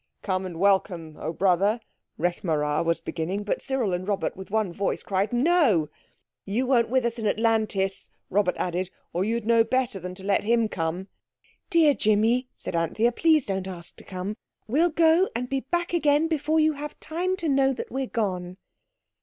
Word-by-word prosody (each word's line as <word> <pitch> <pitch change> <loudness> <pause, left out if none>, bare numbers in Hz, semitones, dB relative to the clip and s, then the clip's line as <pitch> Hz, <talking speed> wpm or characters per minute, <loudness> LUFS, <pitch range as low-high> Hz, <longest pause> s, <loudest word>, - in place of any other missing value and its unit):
"Come, 185 0 -1
and 175 -3 -8
welcome, 185 -5 +1
oh 155 - -3
brother," 195 +5 +2 0.4
Rekh 175 +2 -1
marā 150 -3 0
was 170 0 0
beginning, 180 +5 -3
but 205 - -2
Cyril 255 -8 -1
and 180 +2 -3
Robert 200 -2 -1
with 190 0 -9
one 210 -4 0
voice 200 +2 -2
cried, 195 +1 0
"No." 245 - +3 0.5
"You 220 +6 -1
weren't 245 -3 +3
with 255 0 +2
us 235 0 -2
in 220 - -1
Atlantis," 215 -3 0 0.2
Robert 195 -1 +2
added, 180 +1 -2 0.2
"or 175 - 0
you'd 230 +1 -1
know 230 0 +5
better 245 -3 -1
than 180 0 -7
to 190 - -12
let 200 0 +1
him 230 +1 +2
come." 175 0 -3 0.6
"Dear 320 -4 +5
Jimmy," 225 +3 +2
said - - -6
Anthea, 190 +8 +1
"please 310 +2 +3
don't 190 -1 -3
ask 175 -2 -8
to - - -12
come. 190 +3 -5 0.3
We'll 310 +10 +3
go 330 +3 +4
and 245 +2 -2
be 270 +1 -1
back 345 +6 -2
again 300 -1 +3
before 315 0 +1
you 310 0 +3
have 295 +1 -7
time 360 +4 -2
to 335 - -3
know 270 -1 +3
that 255 - -6
we're 265 0 -2
gone." 185 -6 -3
215 Hz, 185 wpm, -26 LUFS, 185-265 Hz, 0.6 s, know